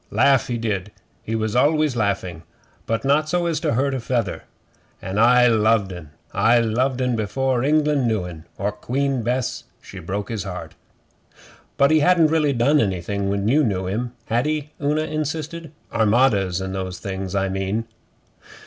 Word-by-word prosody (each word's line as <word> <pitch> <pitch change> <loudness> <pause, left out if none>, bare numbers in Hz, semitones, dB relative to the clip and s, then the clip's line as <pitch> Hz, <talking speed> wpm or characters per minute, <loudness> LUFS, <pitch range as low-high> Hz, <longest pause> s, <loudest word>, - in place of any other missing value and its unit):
Laugh 135 -4 +3
he 120 - -2
did 105 -3 -3 0.3
he 110 - -4
was 110 0 -2
always 150 +1 +3
laughing 100 -7 -1 0.5
but 115 +3 -1
not 150 +3 +2
so 175 +1 0
as 165 -3 0
to 160 -2 0
hurt 135 +2 +1
a 135 - -2
feather. 115 -5 -2 0.5
An' 95 +2 -3
I 125 +2 +6
loved 110 -4 +2
'en. 85 -4 -10 0.2
I 120 +2 +4
loved 125 +3 0
'en 125 -1 0
before 125 +4 0
England 150 -2 +2
knew 110 -5 0
'en, 85 -3 -9
or 100 +1 -1
Queen 130 +5 -1
Bess 125 +2 -2
she 95 - -11
broke 95 +4 -4
his 110 -4 -3
heart.' 90 -2 -7 1.0
'But 140 +2 +4
he 155 - +5
hadn't 165 -1 +4
really 155 -3 +2
done 140 +4 +3
anything 100 -1 -1
when 100 +1 -1
you 145 +6 +4
knew 95 -6 -1
him, 115 +6 -3
had 120 +5 0
he?' 150 -1 -2
Una 150 +2 +1
insisted. 155 +1 -4 0.2
'Armadas 105 -5 +2
and 95 0 -4
those 95 -1 -4
things, 95 -1 -5
I 95 0 +1
mean. 95 +4 -2
115 Hz, 170 wpm, -22 LUFS, 100-140 Hz, 1.0 s, I